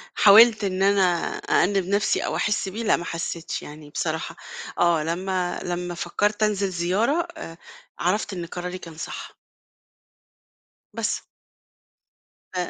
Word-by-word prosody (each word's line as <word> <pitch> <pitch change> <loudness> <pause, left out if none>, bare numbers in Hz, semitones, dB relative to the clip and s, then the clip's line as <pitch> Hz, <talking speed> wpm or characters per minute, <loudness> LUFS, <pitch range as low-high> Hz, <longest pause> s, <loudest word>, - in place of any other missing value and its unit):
حاولت 215 +2 +7
إن 190 -1 0
أنا 200 0 +4 0.4
أأنِّب 195 0 +2
نفْسي 200 +1 +1
أو - - -2
أحس 210 -2 0
بيه 220 +5 -5
لأ 220 - +3
ما 175 - -6
حسّيتش 165 0 -4
يعني 150 0 -11
بصراحة، 160 +1 -3 0.4
آه 170 -3 +3
لمّا 180 +2 -2
لمّا 175 0 -3
فكّرت 205 +5 0
أنزل 200 -2 +1
زيارة 195 - +1
آآ، 165 0 -8 0.4
عرفت 195 +4 0
إن 175 -2 -4
قراري 180 +2 -5
كان 165 -3 -11
صح. - - -7 1.5
بس. - - -1 1.3
أ 180 -1 -1
185 Hz, 130 wpm, -24 LUFS, 170-205 Hz, 1.5 s, حاولت